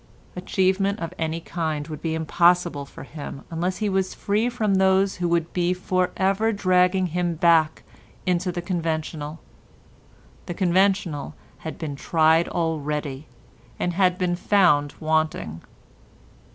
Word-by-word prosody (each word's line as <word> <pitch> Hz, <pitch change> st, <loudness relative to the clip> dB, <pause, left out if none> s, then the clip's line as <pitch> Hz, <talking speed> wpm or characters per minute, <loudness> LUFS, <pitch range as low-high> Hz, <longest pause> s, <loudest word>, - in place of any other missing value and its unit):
Achievement 190 Hz, +2 st, +1 dB
of 165 Hz, +1 st, -5 dB
any 160 Hz, 0 st, -1 dB
kind 160 Hz, -3 st, -3 dB
would 155 Hz, -2 st, -7 dB
be 160 Hz, -1 st, -1 dB
impossible 170 Hz, -2 st, +2 dB
for -, -, -11 dB
him 145 Hz, -1 st, -8 dB
unless 175 Hz, +3 st, -1 dB
he 215 Hz, -, -1 dB
was 190 Hz, -1 st, 0 dB
free 215 Hz, +4 st, 0 dB
from 220 Hz, -5 st, 0 dB
those 190 Hz, 0 st, +3 dB
who 175 Hz, -1 st, -1 dB
would 170 Hz, -1 st, 0 dB
be 180 Hz, 0 st, +1 dB
for 185 Hz, 0 st, 0 dB
ever 195 Hz, +4 st, +2 dB
dragging 185 Hz, -2 st, +2 dB
him 175 Hz, -1 st, 0 dB
back 160 Hz, -2 st, +3 dB, 0.4 s
into 180 Hz, 0 st, 0 dB
the 175 Hz, 0 st, -5 dB
conventional. 160 Hz, -3 st, -3 dB, 1.1 s
The 175 Hz, -, -4 dB
conventional 180 Hz, -5 st, +1 dB, 0.2 s
had 160 Hz, -, -7 dB
been 150 Hz, -4 st, -5 dB
tried 160 Hz, +3 st, +3 dB
already 150 Hz, -3 st, -2 dB, 0.5 s
and 175 Hz, -, -1 dB
had 180 Hz, 0 st, +2 dB
been 180 Hz, -1 st, 0 dB
found 175 Hz, -7 st, +3 dB
wanting. 155 Hz, -, -1 dB
175 Hz, 135 wpm, -24 LUFS, 160-185 Hz, 1.1 s, those